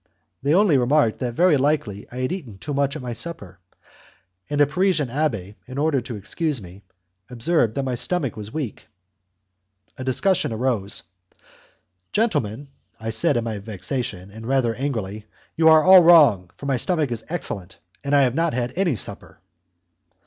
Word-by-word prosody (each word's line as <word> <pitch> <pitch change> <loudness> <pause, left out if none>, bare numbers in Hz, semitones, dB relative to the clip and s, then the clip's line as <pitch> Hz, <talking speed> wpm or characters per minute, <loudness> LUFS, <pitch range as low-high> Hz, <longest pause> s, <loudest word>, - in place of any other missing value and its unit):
They 145 +4 +2
only 185 -8 +4
remarked 125 -2 +2
that 120 -3 -3
very 175 -1 +4
likely 130 -8 -1
I 125 +1 -5
had 130 - -1
eaten 135 - -6
too 145 +9 -6
much 140 +1 0
at 150 - -6
my 120 -1 -4
supper, 105 - -6 0.9
and 145 0 -1
a 145 - +7
Parisian 175 -2 0
abbé, 115 -9 -2
in 130 +1 -8
order 145 -2 +1
to 120 0 -7
excuse 145 - -2
me, 95 0 -12 0.5
observed 120 -1 +1
that 140 - -1
my 130 -1 -2
stomach 140 +2 -2
was 105 -1 -7
weak. 145 -7 -5 1.1
A 130 - -6
discussion 150 +5 +1
arose. 110 -4 -1 1.1
"Gentlemen," 145 - -1 0.3
I 110 0 -4
said, 145 +2 +3
in 120 - 0
my 110 -3 -4
vexation, 105 -1 -5
and 110 +2 -9
rather 130 -3 +1
angrily, 110 -5 -4 0.3
"you 160 0 +5
are 160 -1 +7
all 185 0 +9
wrong, 145 - +6
for - - -9
my 135 -2 +1
stomach 155 0 0
is 115 -2 -4
excellent, 100 - -5 0.3
and 140 0 +1
I 140 - +6
have 125 -2 +1
not 165 -1 0
had 125 0 -2
any 175 -6 +1
supper." - - -6
130 Hz, 170 wpm, -22 LUFS, 110-155 Hz, 1.1 s, all